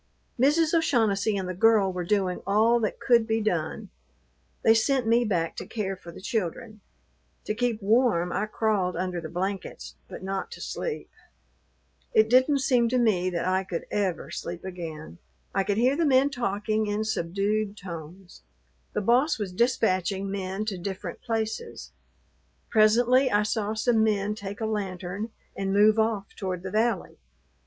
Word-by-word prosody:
Mrs. 305 +5 +3
O'Shaughnessy 220 -10 +2
and 190 -1 -3
the 185 - -3
girl 200 -1 +4
were 180 -1 -3
doing 185 -1 0
all 220 +4 +4
that 215 -3 -2
could 235 -3 +3
be 225 0 +1
done; 175 -8 -2 0.7
they 225 - +6
sent 250 +3 +2
me 230 +2 +4
back 175 -7 -1
to - - -5
care 195 -4 -3
for 170 -2 -12
the - - -11
children. 215 0 -3 0.6
To - - -1
keep 230 -2 -1
warm 205 -5 +3
I 210 - -1
crawled 210 -5 0
under 180 -1 -2
the 160 - -7
blankets, 190 +3 -4
but - - -9
not 195 - -3
to - - -10
sleep. 475 -2 -5 1.0
It 220 +1 +4
didn't 260 +3 +4
seem 245 -3 +3
to 255 - +1
me 200 -7 +2
that 170 -2 -2
I 185 +1 +1
could 175 -3 -5
ever 195 -4 -1
sleep 175 +1 -6
again. 160 - -7 0.3
I 195 - +2
could 200 +1 -1
hear 250 +4 +3
the 335 - +1
men 275 -1 +4
talking 215 -2 -1
in 205 +1 -1
subdued 205 +1 -1
tones. 175 0 -9 0.5
The - - -1
boss 255 +9 +3
was 200 -4 -4
dispatching 195 -3 +1
men 195 +1 -3
to 200 -4 -3
different 190 +1 -6
places. 225 - -4 0.8
Presently 245 +4 +4
I 210 -2 +3
saw 215 0 -1
some 220 0 +2
men 210 -1 +1
take 200 0 -7
a - - 0
lantern 200 -1 -3 0.3
and 195 0 -2
move 210 +2 +5
off 220 -3 -1
toward 185 -3 -4
the 190 - -5
valley. 215 - 0
210 Hz, 165 wpm, -26 LUFS, 190-230 Hz, 1.0 s, they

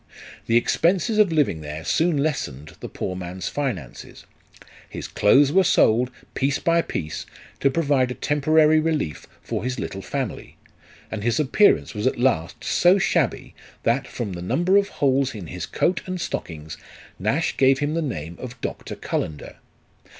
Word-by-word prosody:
The 115 - +4
expenses 180 - +2
of 205 -5 +5
living 145 - +1
there 75 +1 -7
soon 165 -1 +2
lessened 80 - -3
the - - -7
poor 90 - -4
man's 90 0 -5
finances; 115 - -5 0.6
his - - -6
clothes 135 +7 +4
were 190 +4 +5
sold, 120 -7 +3 0.2
piece 135 +1 0
by 170 0 +2
piece, 80 - -5 0.3
to 140 - +3
provide 140 -4 +1
a 125 - -4
temporary 155 +1 +3
relief 155 - -2 0.2
for - - -3
his 125 +1 -2
little 95 -3 -5
family, 135 +2 -5 0.5
and 110 - -4
his 120 +2 +1
appearance 155 +8 +3
was 105 +2 -1
at - - 0
last 120 -10 0
so 180 +3 +4
shabby, 195 - 0 0.3
that, 120 +3 +1
from 110 -6 -5
the 85 - -6
number 175 - +1
of 200 0 +4
holes 135 -2 +1
in 100 -4 -7
his 90 +1 -6
coat 180 0 0
and 185 -1 -3
stockings, 80 - -5 0.4
Nash 110 - 0
gave 135 0 +4
him 145 +2 -1
the 165 - 0
name 85 - -5
of 125 -1 -8
Doctor - - -5
Cullender. 75 -2 -4
130 Hz, 160 wpm, -23 LUFS, 95-155 Hz, 0.6 s, of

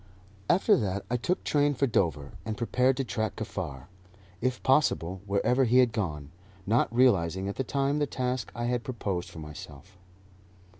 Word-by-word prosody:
After 195 +4 +5
that 100 -3 -2
I - - +2
took 175 +10 -1
train 145 -1 +2
for 140 - +2
Dover, 80 - 0
and 110 -1 -4
prepared 125 +2 +2
to 135 - 0
track 110 -4 -2
Kaffar, 80 -11 -5 0.6
if 130 +1 -1
possible, 95 - +2
wherever 125 +7 +2
he 125 +2 +3
had 125 -3 +5
gone, 75 -10 -3 0.3
not 115 +3 +2
realizing 95 -7 +3
at 100 - -3
the 135 - -1
time 140 +3 0
the 145 - +1
task 125 -4 -2
I 120 - -3
had 120 0 -1
proposed 100 -7 -3
for - - -12
myself. 75 +4 -10
115 Hz, 165 wpm, -28 LUFS, 95-130 Hz, 0.6 s, After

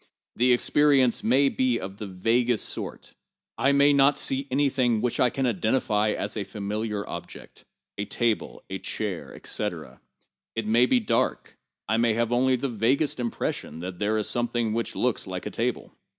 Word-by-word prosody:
The 125 +2 +3
experience 135 0 +3
may 130 +5 +4
be 130 -3 +1
of 95 +1 -7
the 105 - -6
vaguest 115 +5 +1
sort. - - -6 0.5
I 140 - +4
may 140 +1 +5
not 140 +1 +4
see 135 +1 0
any 140 +2 +2
thing 125 -4 +1
which 120 +1 -1
I 125 - +4
can 135 +2 -2
identify 110 -1 +1
as 105 - -4
a 105 - -2
familiar 105 +1 -3
objectŌĆö - - -9 0.3
a 100 - -1
table, 115 +1 -1
a - - -5
chair, - - -4
etc. - - -5 0.5
It 115 -1 -2
may 115 +3 +4
be 250 - +3
dark; 220 - -1 0.3
I 110 - +1
may 115 -1 +2
have 115 +1 0
only 130 +1 +3
the 130 +3 -2
vaguest 125 +5 +1
impression 115 -9 -3
that 90 +1 -6
there 105 +1 +1
is 105 - -1
something 120 -2 -1
which 115 +1 -2
looks - - 0
like - - -5
a - - -4
table. - - -3
120 Hz, 175 wpm, -26 LUFS, 110-130 Hz, 0.5 s, may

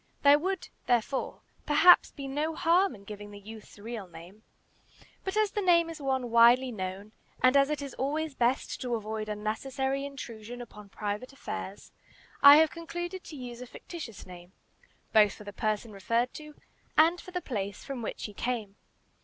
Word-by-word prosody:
There 285 +1 +7
would, 375 +2 -3 0.2
therefore, 245 +2 0 0.2
perhaps 340 +4 +7
be 275 -1 -8
no 300 +4 -2
harm 360 0 +3
in 200 - -15
giving 205 0 -9
the 205 - -10
youth's 215 +1 -12
real 215 -1 -7
name; 175 +5 -13 0.8
but 380 +2 -3
as 430 -2 +2
the 415 - -2
name 340 -3 +4
is 320 - -9
one 260 -3 -1
widely 240 +2 +6
known, 195 0 -5 0.3
and 255 +1 +5
as 275 0 +5
it 300 -1 -2
is 275 - -7
always 300 +3 -2
best 250 +1 0
to 245 -2 -1
avoid 215 0 -4
unnecessary 265 +6 -2
intrusion 245 -4 -8
upon 210 -4 -11
private 210 +6 -4
affairs, 205 -7 -7 0.5
I 280 0 +11
have 315 0 +5
concluded 345 +2 -6
to 310 - -9
use 245 -3 -8
a 250 - -8
fictitious 270 - -9
name, 180 0 -12 0.6
both 210 -2 +6
for - - -12
the 205 0 -9
person 215 +1 -2
referred 230 +5 -1
to 300 -1 -10 0.4
and 335 +3 +5
for - - -12
the 360 0 -3
place 205 - -4
from 270 -3 -5
which 225 - -5
he 210 - -5
came. 220 -3 -3
245 Hz, 175 wpm, -29 LUFS, 215-300 Hz, 0.8 s, I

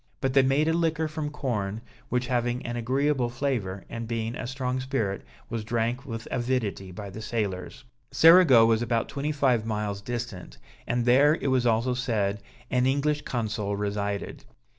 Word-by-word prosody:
But 135 -1 -1
they 135 - +6
made 135 +4 +2
a 160 - +3
liquor 165 -1 +1
from 155 -1 -4
corn, 110 -8 -3 0.3
which 125 0 0
having 120 0 -1
an 120 0 -3
agreeable 130 +2 +1
flavour, 120 -7 -2
and 115 -1 -6
being 115 0 -2
a - - -5
strong 130 0 -2
spirit, 130 -7 -2 0.2
was 115 -2 -4
drank 120 +4 -1
with 115 -2 -6
avidity 120 -7 -1
by 100 +2 -7
the 110 - -8
sailors. 105 -5 -3 0.3
Cerigo 165 -9 +7
was 115 0 +3
about 115 -1 0
twenty 145 +2 -2
five 130 -6 +2
miles 105 -2 -3
distant, 120 -5 -6 0.3
and 120 0 0
there, 140 +5 +5
it 140 - -1
was 125 -2 +2
also 115 +2 +2
said, 105 -5 -1 0.3
an 125 0 +2
English 145 +2 +1
consul 110 -6 -2
resided. 100 0 -3
120 Hz, 165 wpm, -27 LUFS, 110-135 Hz, 0.3 s, Cerigo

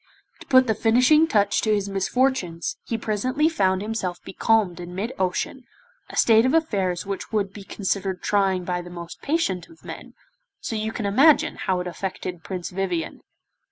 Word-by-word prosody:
To - - -13
put 260 0 +6
the 225 - +2
finishing 250 +9 +4
touch 205 -7 +2
to 220 - +1
his 200 -1 -2
misfortunes 195 -3 0
he 230 - -1
presently 255 +8 0
found 190 - +1
himself 200 -5 -3
becalmed 205 -4 +1
in 175 0 -8
mid 215 +6 -3
ocean, 190 +8 -2 0.4
a - - -8
state 225 -1 +5
of 260 +5 +2
affairs 195 - 0
which 195 0 -5
would 200 -3 -1
be 205 - -9
considered 195 -1 -3
trying 195 -3 +1
by 180 0 -2
the 175 - -10
most 170 -1 -9
patient 280 - -1
of 330 - -18
men, - - -9 0.4
so 225 - -4
you 220 0 -2
may 220 -2 -3
imagine 275 +10 +4
how 185 -1 -1
it - - -6
affected 180 -1 -5
Prince 180 -2 -5
Vivien! 180 -3 -3
200 Hz, 175 wpm, -24 LUFS, 185-230 Hz, 0.4 s, put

